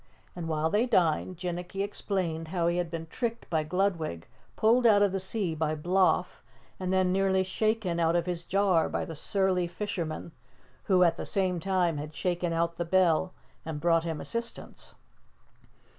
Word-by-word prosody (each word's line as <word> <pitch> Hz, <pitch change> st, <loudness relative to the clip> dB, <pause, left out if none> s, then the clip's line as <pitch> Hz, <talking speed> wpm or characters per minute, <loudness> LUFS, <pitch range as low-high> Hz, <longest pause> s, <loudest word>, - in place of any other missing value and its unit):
And 170 Hz, -2 st, -5 dB
while 160 Hz, 0 st, 0 dB
they 225 Hz, +4 st, +2 dB
dined, 180 Hz, -4 st, +1 dB
Jinnicky 180 Hz, +2 st, -3 dB
explained 185 Hz, -5 st, -3 dB
how 170 Hz, 0 st, -1 dB
he 170 Hz, +1 st, +1 dB
had 175 Hz, -1 st, -1 dB
been 165 Hz, -1 st, -5 dB
tricked 235 Hz, +7 st, -4 dB
by 160 Hz, -2 st, +2 dB
Gludwig, 160 Hz, -, -1 dB, 0.3 s
pulled 235 Hz, +2 st, +4 dB
out 205 Hz, -2 st, +6 dB
of 200 Hz, -, +3 dB
the 195 Hz, -, -1 dB
sea 190 Hz, -2 st, -2 dB
by 155 Hz, 0 st, -1 dB
Bloff 180 Hz, +2 st, +1 dB, 0.4 s
and 185 Hz, -1 st, -2 dB
then 185 Hz, -1 st, +2 dB
nearly 190 Hz, 0 st, +2 dB
shaken 195 Hz, -2 st, 0 dB
out 165 Hz, 0 st, +2 dB
of 170 Hz, -1 st, +1 dB
his 175 Hz, -2 st, -3 dB
jar 190 Hz, -3 st, +2 dB
by -, -, -2 dB
the 165 Hz, -, -7 dB
surly 185 Hz, +2 st, 0 dB
fisherman, 170 Hz, -4 st, -4 dB, 0.5 s
who 185 Hz, -2 st, +4 dB
at 170 Hz, -, +3 dB
the -, -, -4 dB
same 185 Hz, -3 st, 0 dB
time 180 Hz, -3 st, +1 dB
had 150 Hz, +1 st, -7 dB
shaken 175 Hz, +2 st, -1 dB
out 170 Hz, 0 st, 0 dB
the 170 Hz, -, -1 dB
bell 180 Hz, 0 st, +2 dB, 0.3 s
and 160 Hz, -2 st, -5 dB
brought 165 Hz, +1 st, +3 dB
him 165 Hz, -2 st, -3 dB
assistance. 235 Hz, 0 st, -6 dB
180 Hz, 175 wpm, -29 LUFS, 165-195 Hz, 0.5 s, out